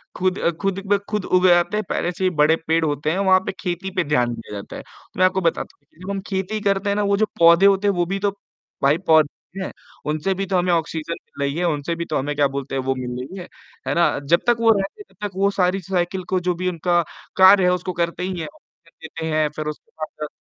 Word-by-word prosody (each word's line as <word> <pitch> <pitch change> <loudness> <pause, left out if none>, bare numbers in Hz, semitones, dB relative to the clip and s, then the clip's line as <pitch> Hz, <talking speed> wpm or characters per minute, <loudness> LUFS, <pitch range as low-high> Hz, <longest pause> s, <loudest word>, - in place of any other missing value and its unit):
खुद 185 +1 0
अ, - - +2
खुद 195 -1 0
पे 205 - +5
खुद 210 -3 -2
उग 185 0 +3
आते 175 +4 +3
हैं, 215 - -1
पहले 175 - -1
से 185 +2 -6
ही 185 - +4
बड़े 155 +2 +5
पेड़ 165 0 +2
होते 150 +1 -1
हैं 180 - -1
वहाँ 190 -1 +5
पे, - - -1
खेती 180 0 -3
पे 185 - +2
ध्यान 125 -5 +1
दिया 115 - -10
जाता 100 - -7
है। - - -7 0.3
मैं 185 - +5
आपको 190 +1 +1
बताता 170 - -1
हूँ - - -38
कि 160 - -26
जब 190 - -7
हम 195 - -2
खेती 195 +2 -2
करते 195 +1 +1
हैं 200 - +1
ना 210 - +1
वो 200 - +3
जो 215 - +3
पौधे 170 +3 +7
होते 200 +1 +4
हैं 200 - +3
वो 175 0 +1
भी 195 - -1
तो 200 0 +1 0.5
भाई 140 +3 +4
पौधे 160 +3 +2
हैं, - - -5 0.3
उनसे 155 +5 0
भी 195 +1 -3
तो 190 -1 0
हमें 180 0 +1
ऑक्सीजन 165 0 -2
मिल 140 - -8
रही 140 +1 -2
है, 175 - 0
उनसे 155 +1 -1
भी 170 0 -4
तो 155 - -2
हमें 145 +2 -2
क्या 145 -1 +3
बोलते 135 0 -5
हैं 135 - 0
वो 135 0 0
मिल 130 -1 -5
रही 135 +10 -7
है, 175 - -8 0.4
है - - +1
ना? 170 -4 +2
जब 170 +5 +3
तक 240 - +5
वो 230 -1 +3
रहते 195 - -5
हैं - - -11
तब 210 - -7
तक 195 - -15
वो 200 +1 +3
सारी 185 0 +1
साइकल 180 +1 -2
को 185 - +1
जो 180 - +3
भी 185 +1 -1
उनका 175 0 +1 0.4
कार्य 190 0 +8
है 180 - +4
उसको 180 0 -3
करते 170 +1 -2
ही 185 -1 -3
हैं, - - -4
ऑक्सीजन 295 - -21 0.2
देते 160 0 -6
हैं, 155 -1 +3
फिर 155 0 -4
उसके 150 - -7
बाद 155 -1 -5
180 Hz, 270 wpm, -22 LUFS, 155-195 Hz, 0.5 s, कार्य